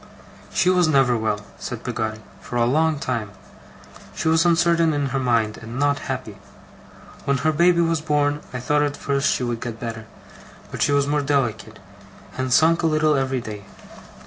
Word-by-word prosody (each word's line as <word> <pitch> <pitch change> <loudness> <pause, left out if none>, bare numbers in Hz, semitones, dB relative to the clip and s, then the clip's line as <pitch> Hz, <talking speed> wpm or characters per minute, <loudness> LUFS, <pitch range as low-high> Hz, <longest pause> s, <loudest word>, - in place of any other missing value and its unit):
'She - - +1
was 180 -2 +4
never 135 -5 +3
well,' 110 -2 -2
said - - -6
Peggotty, 110 -1 -3 0.2
'for - - -8
a 120 -1 +3
long 155 +5 +2
time. 120 -6 -3 0.9
She - - -2
was 160 +2 +3
uncertain 170 -1 +3
in 145 -2 -1
her 135 +1 -1
mind, 115 -4 +1
and 115 +2 -8
not 145 0 +1
happy. - - -5 0.9
When 140 0 +1
her 155 +5 +1
baby 170 +2 +3
was 165 -2 +1
born, 145 -1 +1
I 125 - -4
thought 145 +4 +1
at 145 -1 -1
first 140 0 0
she - - -1
would 120 -1 -3
get 115 -2 -6
better, 115 -2 -6 0.6
but - - -5
she - - +3
was 140 -1 +3
more 145 +1 0
delicate, 120 -6 -1 0.6
and 130 0 -3
sunk 165 +5 +4
a 165 - +2
little 155 -1 +2
every 135 -2 -1
day. 105 -3 -8
140 Hz, 180 wpm, -22 LUFS, 120-155 Hz, 0.9 s, was